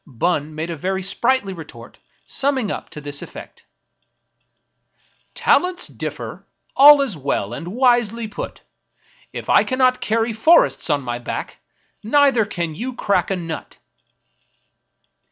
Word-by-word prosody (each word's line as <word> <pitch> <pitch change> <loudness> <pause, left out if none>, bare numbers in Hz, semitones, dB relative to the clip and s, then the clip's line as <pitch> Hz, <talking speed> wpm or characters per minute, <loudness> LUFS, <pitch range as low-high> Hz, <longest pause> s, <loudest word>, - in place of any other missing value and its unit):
Bun 150 +3 -2
made 160 +2 -4
a - - -4
very 190 +5 -3
sprightly 205 +1 0
retort, 135 -9 -12 0.3
sum 280 +1 0
ming 235 -6 -2
up - - -6
to - - -8
this 145 0 -4
effect: - - -11 0.5
— - - -51
" - - -39
Talents 360 0 +3
differ; - - -7 0.3
all 285 +1 +8
is 240 -9 -3
well 135 -7 -2
and 165 - -7
wisely 235 0 +1
put; 210 - -7 0.7
If - - -7
I - - +5
cannot 255 -1 +1
carry 225 +1 0
forests 315 - +3
on 145 -2 +1
my 120 -1 -4
back, 120 - -6 0.4
Neither 270 -1 +3
can 170 -6 -4
you 245 +10 -5
crack 200 -3 0
a 195 - 0
nut." 165 -3 -7
205 Hz, 140 wpm, -20 LUFS, 155-255 Hz, 0.7 s, all